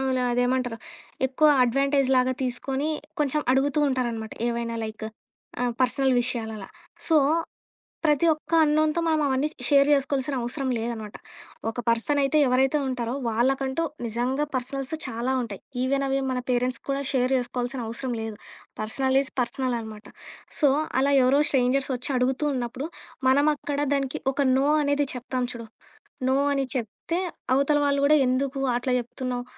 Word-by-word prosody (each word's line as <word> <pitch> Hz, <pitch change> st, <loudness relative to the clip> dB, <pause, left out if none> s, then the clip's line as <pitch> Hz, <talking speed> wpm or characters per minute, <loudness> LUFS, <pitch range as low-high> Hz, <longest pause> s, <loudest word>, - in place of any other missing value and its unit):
ఆహ్, 265 Hz, 0 st, 0 dB
ల -, -, +1 dB
అదేమంటారు 245 Hz, -1 st, 0 dB, 0.5 s
ఎక్కువ 270 Hz, +4 st, +2 dB, 0.2 s
అడ్వాంటేజ్‌లాగా 265 Hz, 0 st, +2 dB
తీసుకొని 265 Hz, +4 st, -2 dB, 0.3 s
కొంచెం 295 Hz, 0 st, +1 dB
అడుగుతూ 270 Hz, +3 st, +2 dB
ఉంటారనమాట. 235 Hz, -4 st, -2 dB, 0.2 s
ఏవైనా 235 Hz, 0 st, -2 dB
లైకు 220 Hz, 0 st, -6 dB, 0.5 s
ఆహ్, 245 Hz, -1 st, +1 dB
పర్సనల్ 260 Hz, +1 st, +2 dB
విషయాలలా. 220 Hz, -5 st, -4 dB, 0.4 s
సో, 325 Hz, -, +4 dB, 0.9 s
ప్రతి 300 Hz, +2 st, +3 dB
ఒక్క 305 Hz, +1 st, -8 dB
అన్‌నోన్‌తో 310 Hz, +2 st, +2 dB
మనం 315 Hz, -1 st, +2 dB
అవన్నీ 265 Hz, +3 st, +1 dB, 0.2 s
షేర్ 280 Hz, 0 st, +5 dB
చేసుకోవాల్సిన 275 Hz, 0 st, -1 dB
అవసరం 260 Hz, +3 st, -3 dB
లేదనమాట. 225 Hz, -2 st, -5 dB, 0.6 s
ఒక -, -, -13 dB
పర్సనయితే 275 Hz, +5 st, +2 dB
ఎవరైతే 265 Hz, +3 st, +3 dB
ఉంటారో, 245 Hz, -1 st, -2 dB
వాళ్ళకంటూ 265 Hz, +6 st, 0 dB, 0.2 s
నిజంగా 245 Hz, +6 st, -1 dB
పర్సనల్స్ 265 Hz, +3 st, -3 dB
చాలా 240 Hz, +2 st, -2 dB
ఉంటాయి. 205 Hz, -5 st, -7 dB, 0.2 s
ఈవెనవి 275 Hz, +1 st, +1 dB
మన 255 Hz, -1 st, -1 dB
పేరెంట్స్ 250 Hz, +1 st, 0 dB
కూడా 275 Hz, +1 st, 0 dB
షేర్ 255 Hz, 0 st, +2 dB
చేసుకోవాల్సిన 245 Hz, +1 st, -2 dB
అవసరం 245 Hz, +2 st, -3 dB
లేదు. 220 Hz, -1 st, -5 dB, 0.4 s
పర్సనల్ 265 Hz, +5 st, +1 dB
ఇస్ 270 Hz, -, -7 dB
పర్సనల్ 250 Hz, 0 st, -2 dB
అనమాట. 220 Hz, -1 st, -9 dB, 0.5 s
సో, 290 Hz, -3 st, +5 dB, 0.3 s
అలా 280 Hz, +1 st, +2 dB
ఎవరో 275 Hz, +3 st, +4 dB
స్ట్రేంజర్సొచ్చి 260 Hz, 0 st, 0 dB
అడుగుతూ 265 Hz, +4 st, 0 dB
ఉన్నప్పుడు, 250 Hz, +4 st, -3 dB, 0.4 s
మనం 285 Hz, +3 st, +4 dB
అక్కడ 285 Hz, 0 st, -4 dB, 0.2 s
దానికి 275 Hz, -1 st, -2 dB
ఒక 285 Hz, -, +1 dB
నో 270 Hz, +1 st, +2 dB, 0.2 s
అనేది 285 Hz, 0 st, +1 dB
చెప్తాం 250 Hz, 0 st, -2 dB
చూడు, 230 Hz, -1 st, -8 dB, 0.6 s
నో 260 Hz, -, +3 dB, 0.2 s
అని 275 Hz, -1 st, +1 dB
చెప్తే, 255 Hz, -, -3 dB, 0.4 s
అవతల 280 Hz, +2 st, +3 dB
వాళ్ళు 280 Hz, -1 st, +2 dB
కూడా 300 Hz, +2 st, +6 dB
"ఎందుకు 270 Hz, +2 st, 0 dB
అట్లా 245 Hz, +2 st, -1 dB
చెప్తున్నావు, 245 Hz, 0 st, -4 dB
260 Hz, 140 wpm, -25 LUFS, 245-275 Hz, 0.9 s, కూడా